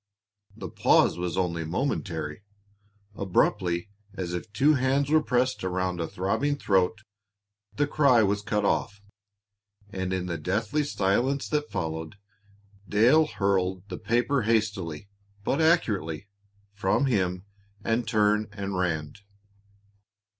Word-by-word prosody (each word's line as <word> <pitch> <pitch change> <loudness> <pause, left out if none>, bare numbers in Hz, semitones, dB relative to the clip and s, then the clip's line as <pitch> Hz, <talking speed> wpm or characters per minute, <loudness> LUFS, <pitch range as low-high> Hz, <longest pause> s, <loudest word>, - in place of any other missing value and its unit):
The 95 -4 -6
pause - - +3
was 90 -1 -3
only 85 -3 0
momentary. 80 - -3 0.7
Abruptly, 95 -1 0 0.2
as 90 -2 -4
if 90 +5 -5
two 140 +8 +4
hands 135 +1 +1
were 155 0 +5
pressed 130 -5 0
around 90 -1 -1
a 85 - -2
throbbing 100 - -1
throat, 100 -2 +1 0.7
the 145 - +2
cry 140 -6 +4
was 100 0 +1
cut 105 0 -1
off, 105 +1 0 0.9
and 95 -2 -3
in 95 -1 -1
the 85 -2 -4
deathly 105 - 0
silence 130 +3 0
that 150 -1 -1
followed, 80 -2 -4 0.7
Dale 125 +10 +5
hurled 95 -5 0
the 90 - -6
paper 120 +4 +1
hastily, 105 -7 -1 0.4
but 140 +9 0
accurately, 100 - +1 0.5
from 100 +7 +1
him, 95 -6 0 0.4
and 115 0 0
turned 105 -1 +2
and 100 -1 -4
ran. 80 -5 -1
100 Hz, 120 wpm, -27 LUFS, 90-120 Hz, 0.9 s, were